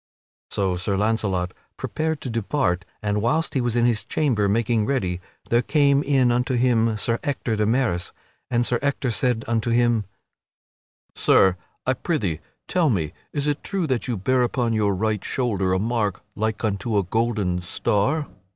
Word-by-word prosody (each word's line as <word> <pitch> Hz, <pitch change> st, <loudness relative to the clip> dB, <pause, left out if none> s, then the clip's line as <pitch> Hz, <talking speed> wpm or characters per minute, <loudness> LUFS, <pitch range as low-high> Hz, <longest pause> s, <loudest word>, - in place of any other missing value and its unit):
So 95 Hz, -3 st, 0 dB
Sir 95 Hz, +2 st, -1 dB
Launcelot 100 Hz, -4 st, 0 dB, 0.3 s
prepared 160 Hz, -1 st, -2 dB
to 130 Hz, -, -4 dB
depart, 110 Hz, -5 st, 0 dB, 0.2 s
and 105 Hz, 0 st, 0 dB
whilst 155 Hz, +8 st, +1 dB
he 135 Hz, -, +1 dB
was 120 Hz, -1 st, -1 dB
in 120 Hz, -1 st, +3 dB
his 115 Hz, -3 st, +2 dB
chamber 115 Hz, -10 st, +1 dB
making 110 Hz, 0 st, +1 dB
ready 95 Hz, -10 st, -1 dB, 0.3 s
there 120 Hz, +1 st, +4 dB
came 140 Hz, 0 st, +3 dB
in 135 Hz, -4 st, +3 dB
unto 125 Hz, +2 st, +1 dB
him 115 Hz, -3 st, +2 dB
Sir 115 Hz, +2 st, 0 dB
Ector 135 Hz, -5 st, -2 dB
de 105 Hz, -1 st, +1 dB
Maris. 115 Hz, -7 st, 0 dB, 0.4 s
And 120 Hz, -1 st, +2 dB
Sir 120 Hz, -1 st, +2 dB
Ector 140 Hz, -3 st, 0 dB
said 120 Hz, 0 st, 0 dB
unto 115 Hz, 0 st, 0 dB
him: 120 Hz, -2 st, +2 dB, 1.1 s
"Sir, 95 Hz, -2 st, +4 dB, 0.3 s
I 130 Hz, -, +3 dB
prithee 110 Hz, -, -1 dB, 0.3 s
tell 170 Hz, -4 st, +2 dB
me 80 Hz, -, -1 dB, 0.2 s
is 145 Hz, -1 st, -1 dB
it 145 Hz, -1 st, -1 dB
true 195 Hz, -4 st, -1 dB
that 130 Hz, -5 st, -1 dB
you 120 Hz, -3 st, -1 dB
bear 125 Hz, +7 st, +2 dB
upon 120 Hz, -1 st, 0 dB
your 105 Hz, -3 st, +1 dB
right 105 Hz, +1 st, -1 dB
shoulder 100 Hz, -8 st, 0 dB
a 95 Hz, -, +3 dB
mark 105 Hz, -2 st, -1 dB
like 110 Hz, +1 st, -2 dB
unto 105 Hz, +2 st, -1 dB
a 100 Hz, -, +3 dB
golden 105 Hz, -3 st, 0 dB
star?" 120 Hz, -, 0 dB
115 Hz, 170 wpm, -23 LUFS, 105-130 Hz, 1.1 s, there